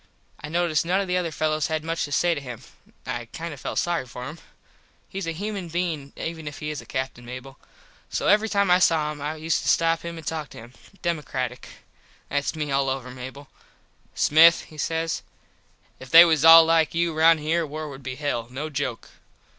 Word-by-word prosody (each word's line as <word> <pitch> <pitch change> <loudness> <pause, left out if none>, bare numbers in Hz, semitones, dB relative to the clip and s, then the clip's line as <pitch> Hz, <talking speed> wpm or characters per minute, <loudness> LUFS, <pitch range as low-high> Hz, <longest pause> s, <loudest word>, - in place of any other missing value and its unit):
I 150 - -5
noticed 170 -1 +1
none 180 +3 +1
of 200 - -2
the 180 0 +1
other 175 -2 -1
fellos 155 -1 -1
had 155 -1 -2
much 165 +1 -2
to 145 - -10
say 175 +4 +2
to 145 - -5
him. 125 -4 -8 0.4
I - - -2
felt - - -38
kind 165 -1 -5
of 140 - -6
sorry 170 -6 0
for 125 +1 -8
him. 160 +3 -9 0.7
Hes 195 -3 -4
a - - -1
human 195 +2 -5
bein 165 -5 -3
even 160 -2 -6
if 145 - -6
he 150 0 -4
is 150 - -5
a - - -16
Captin, 130 -2 -4
Mable. 130 +3 -9 0.5
So - - -2
every 215 +2 +4
time 200 -3 +2
I 180 - +6
saw 160 -4 +2
him 145 -1 -9
I 150 +2 -3
used 160 +1 -1
to - - -6
stop 165 0 +2
him 170 0 -7
and 160 - -10
talk 155 -2 -4
to - - -13
him. 120 +2 -12 0.3
Democratic. 130 -7 -3 0.6
Thats 145 +2 -1
me 150 -2 -3
all 135 0 +1
over, 130 -1 -4
Mable. 130 +3 -9 0.7
"Smith" 165 +2 +6
he 155 - -15
says 165 +2 -1 0.8
"If 130 - -11
they 165 +5 +10
was 160 -3 +2
all 165 0 +10
like 165 -1 +2
you 170 0 +1
round 160 +1 +5
here 165 +3 +1
war 155 0 -6
would 140 -2 -9
be 130 -1 -6
hell, 135 -5 -2
no 145 +5 -5
joke." 135 -5 -3
155 Hz, 210 wpm, -24 LUFS, 140-165 Hz, 0.8 s, they